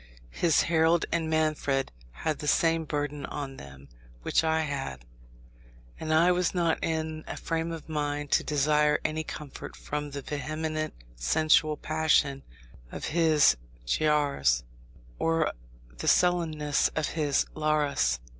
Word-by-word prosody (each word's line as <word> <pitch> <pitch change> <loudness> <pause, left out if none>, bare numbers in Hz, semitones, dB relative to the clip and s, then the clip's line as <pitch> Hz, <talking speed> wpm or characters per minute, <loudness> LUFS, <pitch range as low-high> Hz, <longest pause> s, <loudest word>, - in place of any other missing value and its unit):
His 165 - +3
Harold 165 0 +3
and 165 -1 0
Manfred 155 -4 0 0.2
had 155 - -3
the 150 - -5
same 165 +1 +2
burden 145 -1 -3
on 140 -2 -6
them 70 0 -12 0.4
which - - +2
I 160 0 +2
had; 135 - -4 0.9
and 160 0 -3
I 165 +3 +5
was 180 +1 0
not 170 -2 +1
in 160 -1 -2
a - - -5
frame 165 0 -2
of 165 -2 -7
mind 145 -2 -2
to - - +3
desire 150 0 +2
any 155 +1 -1
comfort 150 -2 -8
from 150 0 -4
the 140 -1 -6
vehement 155 +2 -3 0.2
sensual 155 - +3
passion 155 -3 +1 0.5
of - - -5
his 155 - +4 0.3
Giaours, 140 - +2 0.6
or 165 -1 +1 0.5
the - - -4
sullenness 160 -5 +2
of 155 -2 0
his 150 -3 +1
Laras. 145 - +1
155 Hz, 130 wpm, -28 LUFS, 145-160 Hz, 0.9 s, I